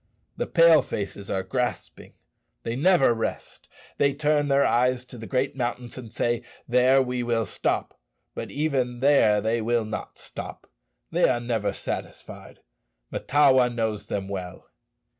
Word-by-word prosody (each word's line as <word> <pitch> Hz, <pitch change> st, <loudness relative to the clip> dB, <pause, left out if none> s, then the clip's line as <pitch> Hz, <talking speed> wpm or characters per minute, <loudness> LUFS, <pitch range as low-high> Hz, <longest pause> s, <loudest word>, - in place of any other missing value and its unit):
The -, -, -3 dB
Pale 165 Hz, -2 st, +6 dB
faces 100 Hz, 0 st, -5 dB
are 95 Hz, -, -1 dB
grasping. 125 Hz, +5 st, -4 dB, 0.5 s
They 115 Hz, -, -3 dB
never 155 Hz, -3 st, +4 dB
rest. 115 Hz, -, -5 dB, 0.3 s
They 140 Hz, -1 st, +3 dB
turn 150 Hz, 0 st, +1 dB
their 140 Hz, 0 st, +3 dB
eyes 125 Hz, +1 st, +2 dB
to 125 Hz, -, -11 dB
the 110 Hz, -, -8 dB
great 130 Hz, +1 st, -1 dB
mountains 120 Hz, -1 st, -4 dB
and 120 Hz, -4 st, -9 dB
say, 120 Hz, 0 st, 0 dB, 0.3 s
'There 125 Hz, +2 st, +4 dB
we 125 Hz, -1 st, -3 dB
will 115 Hz, -2 st, 0 dB
stop.' -, -, -2 dB, 0.3 s
But -, -, -6 dB
even 130 Hz, -5 st, -1 dB
there 120 Hz, -7 st, +4 dB
they 115 Hz, +2 st, 0 dB
will 115 Hz, 0 st, 0 dB
not 110 Hz, 0 st, -6 dB
stop. -, -, -8 dB, 0.5 s
They -, -, +3 dB
are 120 Hz, -, +1 dB
never 115 Hz, -3 st, -1 dB
satisfied; -, -, -7 dB, 0.5 s
Mahtawa 135 Hz, -3 st, +3 dB
knows 110 Hz, -3 st, -3 dB
them 100 Hz, -1 st, -3 dB
well." 95 Hz, -2 st, -7 dB
125 Hz, 145 wpm, -25 LUFS, 115-135 Hz, 0.5 s, Pale